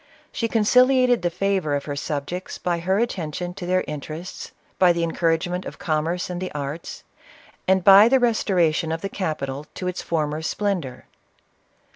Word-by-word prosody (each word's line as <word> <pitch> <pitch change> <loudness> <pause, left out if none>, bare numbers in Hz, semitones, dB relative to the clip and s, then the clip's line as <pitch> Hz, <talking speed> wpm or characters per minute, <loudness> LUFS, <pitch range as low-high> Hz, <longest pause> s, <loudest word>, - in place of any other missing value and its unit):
She 230 - -1
conciliated 250 +2 +4
the 175 - +1
favor 185 -4 0
of 140 - -3
her 145 - -4
subjects 150 +5 -4
by 175 -1 -1
her 190 +3 0
attention 180 -6 -2
to 180 -1 -7
their 185 0 +2
interests, 155 +4 -7 0.3
by 180 -2 +6
the 170 0 -1
en 165 - -1
couragement 175 +2 0
of - - -8
commerce 165 +2 -1
and 180 0 -5
the 185 - -4
arts, 145 +3 -6 0.6
and 190 -1 +3
the 205 +7 +8
restora 195 -9 +2
tion 160 +1 -2
of 165 0 -3
the 195 - -3
capital 150 -7 -4
to 185 - -4
its 180 0 -3
former 155 -2 -2
splendor. 175 -6 -2
175 Hz, 165 wpm, -23 LUFS, 155-195 Hz, 0.6 s, the